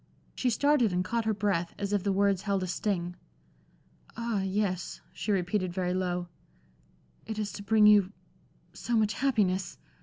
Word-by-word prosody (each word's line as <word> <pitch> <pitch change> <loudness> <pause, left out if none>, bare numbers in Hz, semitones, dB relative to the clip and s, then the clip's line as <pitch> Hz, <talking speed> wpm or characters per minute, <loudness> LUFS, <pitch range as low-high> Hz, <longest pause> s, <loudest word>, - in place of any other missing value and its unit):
She 255 - 0
started 255 -2 +3
and 180 0 0
caught 230 +3 -1
her 220 - +2
breath, 190 -4 -1
as 200 0 -3
if 205 - +2
the 200 - 0
words 195 -1 +2
held 200 -2 -1
a - - -1
sting. 180 -1 -2 1.0
"Ah, 230 -4 -1
yes," 190 -1 -2
she 210 - -3
repeated, 185 -1 0
very 180 0 -1
low 180 -1 -1 1.0
"it 220 -1 -4
is 210 -1 -2
to - - -7
bring 215 +1 +4
you 205 -2 +6 0.6
so 235 -1 -1
much 215 -1 +2
happiness!" 205 -8 0
200 Hz, 160 wpm, -29 LUFS, 185-215 Hz, 1.0 s, you